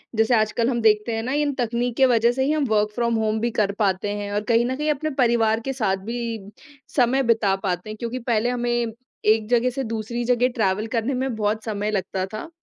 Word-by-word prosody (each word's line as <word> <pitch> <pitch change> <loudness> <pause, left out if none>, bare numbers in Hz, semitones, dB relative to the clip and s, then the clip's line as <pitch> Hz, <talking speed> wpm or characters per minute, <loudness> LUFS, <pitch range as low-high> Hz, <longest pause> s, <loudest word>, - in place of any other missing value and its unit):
जैसे 225 +2 +3
आजकल 220 +2 +1
हम 240 -2 -1
देखते 220 +1 +3
हैं 225 - -2
ना, 255 - -3
इन 290 0 +1
तकनीक 240 -1 -1
के 265 - +6
वजह 235 -1 +4
से 265 +2 -1
ही 295 - +1
हम 305 -2 +1
वर्क 210 -1 +2
फ्रॉम 235 -1 +1
होम 220 0 0
भी 235 +1 -1
कर 200 -2 +1
पाते 205 0 0
हैं 205 0 -5
और 205 - 0
कहीं 235 +1 +4
न 260 +1 -1
कहीं 300 +2 -2
अपने 310 +2 -2
परिवार 230 -3 +3
के 270 - -1
साथ 210 -7 0
भी 230 -3 -4 0.4
समय 265 +1 +3
बिता 220 -4 +2
पाते 180 +2 -2
हैं, 215 - -6
क्योंकि 235 +3 -4
पहले 235 0 0
हमें 240 -1 0 0.4
एक 215 0 +3
जगह 245 +1 +3
से 265 +2 -3
दूसरी 230 +1 -3
जगह 250 0 +3
ट्रैवल 210 0 0
करने 230 +3 -1
में 255 -2 -2
बहुत 215 +1 -1
समय 210 -1 -2
लगता 190 -1 -2
था। 270 +10 -6
230 Hz, 230 wpm, -23 LUFS, 215-245 Hz, 0.4 s, के